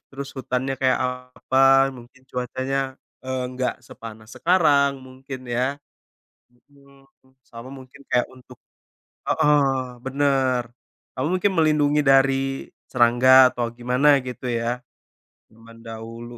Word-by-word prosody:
Terus 135 0 -7
hutannya 130 +1 -2
kayak 130 -1 +1
apa, 130 +1 +2
mungkin 125 +2 -16
cuacanya, 130 +2 -3 0.5
eee, 130 0 -3
nggak 130 -1 -1
sepanas 110 -2 -12
sekarang 145 -6 +2
mungkin, 130 0 -10
ya? 130 +4 -1 0.7
Mhm. 140 +2 -24 0.4
Sama 115 +2 -11
mungkin 135 0 -13
kayak 125 - +2
untuk 130 0 -16 0.7
heeh, 140 -3 +2 0.2
bener. 135 -2 +1 0.6
Atau 130 - -1
mungkin 185 +2 +1
melindungi 150 -2 +3
dari 135 0 +2 0.2
serangga, 125 +1 +5
atau 120 -1 -3
gimana, 125 +4 +2
gitu, 125 0 -7
ya? 120 0 -2 0.7
Zaman 115 +1 -17
dahulu. 115 +1 -9
130 Hz, 110 wpm, -23 LUFS, 125-135 Hz, 0.7 s, serangga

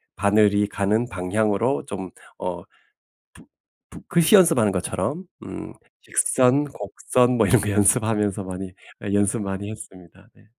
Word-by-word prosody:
바늘이 105 0 +3
가는 105 +4 -1
방향으로 105 +7 -1
좀 95 -2 -7 0.3
어 90 -1 -5 0.7
붓 - - -19 0.4
붓 - - -14
글씨 170 +4 +4
연습하는 165 - +5
것처럼 95 - -3 0.2
음 - - -8 0.3
직선, 130 +2 +2
곡선 125 0 0
뭐 110 - +4
이런 - - +4
거 105 - -2
연습하면서 105 -1 +1
많이 95 0 -7 0.4
연습 100 +2 +1
많이 100 +1 -5
했습니다. 90 -5 -13
네. - - -24
105 Hz, 265 characters per minute, -23 LUFS, 95-120 Hz, 0.7 s, 연습하는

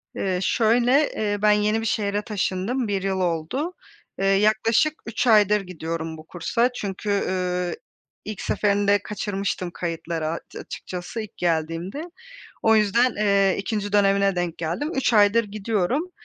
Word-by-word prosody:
Eee, 185 -2 -1
şöyle, 245 +7 +3
eee, 205 -1 -1
ben 210 0 +5
yeni 210 +1 +2
bir - - -4
şehre 205 -2 0
taşındım, 210 +4 -2
1 200 -2 -1
yıl 190 -1 -1
oldu. 180 - -1 0.5
Eee, 195 - 0
yaklaşık 215 +8 +3
3 235 +2 -2
aydır 210 -2 +5
gidiyorum 165 -3 -5
bu 155 - -12
kursa. 230 +8 0
Çünkü, 200 -1 -4
eee, 180 -3 -1 0.5
ilk 215 -2 -6
seferinde 205 0 +2
kaçırmıştım 195 -3 -3
kayıtları 165 -2 -3
a 165 +2 -2 0.2
açıkçası 180 +5 -6
ilk 215 - -10
geldiğimde. 165 - -1 0.6
O 225 0 +5
yüzden, 225 +4 +3
eee, 200 -2 +3
2'nci 205 0 -3
dönemine 200 -1 +3
denk 175 -2 -2
geldim. 170 - -2
3 265 -2 +1
aydır 210 +1 +5
gidiyorum. 215 - -1
200 Hz, 140 wpm, -24 LUFS, 180-220 Hz, 0.6 s, ben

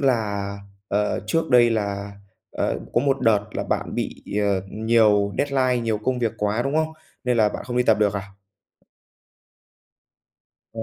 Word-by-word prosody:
là, 105 -7 0 0.4
ờ, 105 +1 0
trước 165 +5 0
đây 120 -2 +6
là, 100 -2 -2 0.4
ờ, - - -1 0.2
có 120 - +4
một 135 0 +1
đợt 110 -4 +3
là - - -2
bạn - - -2
bị, - - -4 0.2
ờ, 100 -2 +1
nhiều 105 -2 +3
deadline, 130 -3 +1
nhiều 110 -2 0
công 125 +4 -1
việc 115 -3 0
quá, 105 +3 0
đúng 135 +3 -2
hông? 160 0 0 0.3
Nên 125 -1 +1
là 110 -2 +4
bạn - - -6
không 120 -1 -4
đi 125 - +4
tập 110 -3 +3
được 105 -1 +2
à? 100 - -2 2.5
Ờ. 115 - -5
115 Hz, 165 wpm, -23 LUFS, 105-125 Hz, 2.5 s, đây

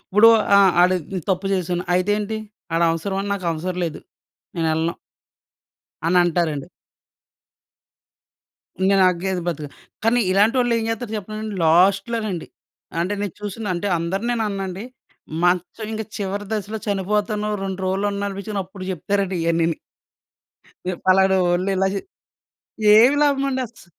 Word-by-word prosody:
ఇప్పుడు 210 +4 +5 0.3
ఆ! - - +7 0.2
ఆడు 185 +1 +4 0.3
తప్పు 190 +1 0
చేసాను 180 -1 -2
అయితేంటి? 205 +3 0 0.4
ఆడవసరమా, 170 +4 +1
నాకవసరం 180 -1 -2
లేదు. 160 -2 -5 0.6
నేనెళ్ళను. 160 0 0 1.1
అనంటారండి. 170 -4 +2 2.2
ఇంగా 195 +1 +4
నాకేది 185 0 +1
బతుకు. 155 -3 -3 0.4
కానీ 235 +2 +3
ఇలాంటోల్లేం 230 +4 +3
జేత్తరు 225 0 -3
చెప్పనండి 215 +1 -6
లాస్ట్‌లో 195 +7 +3
నండి. 180 -6 -4 0.5
అంటే 185 +4 0
నేను 205 -4 -3
చూసిన, 210 +2 -5
అంటే 175 +4 -3
అందరినేననండి. 195 +1 -2 0.6
మంచం 180 +5 0 0.3
చివరి 205 0 -3
దశలో 215 0 -3
చనిపోతాను 210 +1 -1
2 190 -1 -4
రోజులన్ననిపిచ్చినప్పుడు 200 0 -3
జెప్తారండి 195 +1 -1
ఇయన్నిని. 165 0 +1 1.2
ఎప్ 175 - -8
పలానోళ్లు 185 -1 +3
ఇలా 190 +1 +2
చే 200 - -1 1.0
ఏమి 245 +6 +6
లాభమండస్ 270 -6 0
195 Hz, 100 wpm, -22 LUFS, 180-210 Hz, 2.2 s, ఆ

